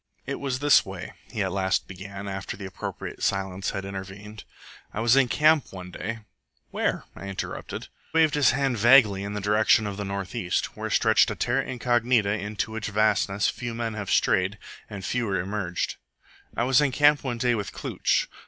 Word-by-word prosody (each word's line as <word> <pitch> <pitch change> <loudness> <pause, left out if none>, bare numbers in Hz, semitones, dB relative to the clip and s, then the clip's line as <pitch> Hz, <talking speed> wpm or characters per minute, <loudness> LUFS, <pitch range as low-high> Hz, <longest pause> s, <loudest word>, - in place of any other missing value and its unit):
"It 140 - -4
was 135 -2 -2
this 145 +1 +5
way," 95 -2 -8 0.2
he - - -1
at - - -2
last 95 -1 0
began, 95 +2 -8
after 95 0 -5
the 100 - -7
appropriate 95 - -6
silence 95 -1 -1
had 95 - -4
intervened. 100 +2 -8 0.5
"I - - -5
was 115 +2 +4
in 135 -2 +5
camp 155 +2 +3
one 90 -1 -8
day 110 +6 -5 0.2
" - - -46
"Where?" - - -1
I 100 - -8
interrupted. 100 -1 -5
He - - -13 0.3
waved 160 -2 +4
his 145 -3 +4
hand 135 -2 0
vaguely 115 -4 +6
in 100 +1 -4
the 105 - -3
direction 105 +2 +3
of 100 -1 -4
the 105 - -3
north 100 -1 -4
east, 110 -7 -1
where - - -4
stretched - - +4
a - - -3
TERRA - - 0
INCOGNITA 120 -4 +1
into 105 +1 -3
which 110 0 -4
vastness 105 -1 +2
few 120 -2 -4
men 115 -1 -2
have 105 -2 -5
strayed 95 +3 +2 0.3
and 100 -3 -7
fewer 115 -6 -1
emerged. 95 -2 -3 0.6
"I - - +2
was 130 +2 +4
in 145 -2 +2
camp 145 +2 +4
one 125 -3 -2
day 120 0 +2
with 105 -3 -3
Klooch. - - 0
105 Hz, 190 wpm, -26 LUFS, 95-120 Hz, 0.6 s, vaguely